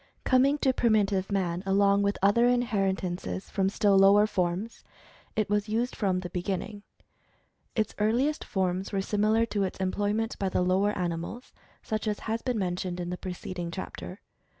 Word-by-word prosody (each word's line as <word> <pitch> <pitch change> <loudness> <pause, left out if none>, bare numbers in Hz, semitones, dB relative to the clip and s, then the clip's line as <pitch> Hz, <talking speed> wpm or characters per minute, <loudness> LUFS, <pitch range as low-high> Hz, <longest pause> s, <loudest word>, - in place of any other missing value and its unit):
Coming 270 +2 +4
to 265 -2 +2
primitive 205 -5 +1
man 180 -3 0
along 200 +1 +3
with 200 0 0
other 235 +5 +5
inheritances 195 -7 -1
from 195 -1 +1
still 200 0 +2
lower 200 +2 +6
forms, 185 +2 -2 0.5
it 215 -1 +1
was 210 +1 0
used 235 +3 -1
from 185 -3 0
the 180 -2 -7
beginning. 190 +3 -3 0.9
Its 220 -1 0
earliest 245 +8 +1
forms 190 0 -1
were 200 - 0
similar 215 +3 +2
to 210 -3 -2
its 190 - -2
employment 205 +4 -1
by 195 - 0
the 180 - +1
lower 190 +3 +1
animals, 175 +7 -4 0.3
such 215 -1 -3
as 210 -1 -2
has 225 +1 -2
been 250 -3 -1
mentioned 180 -1 -2
in 175 0 -4
the - - -2
preceding 180 -1 -5
chapter. 185 +2 -7
200 Hz, 160 wpm, -28 LUFS, 185-220 Hz, 0.9 s, lower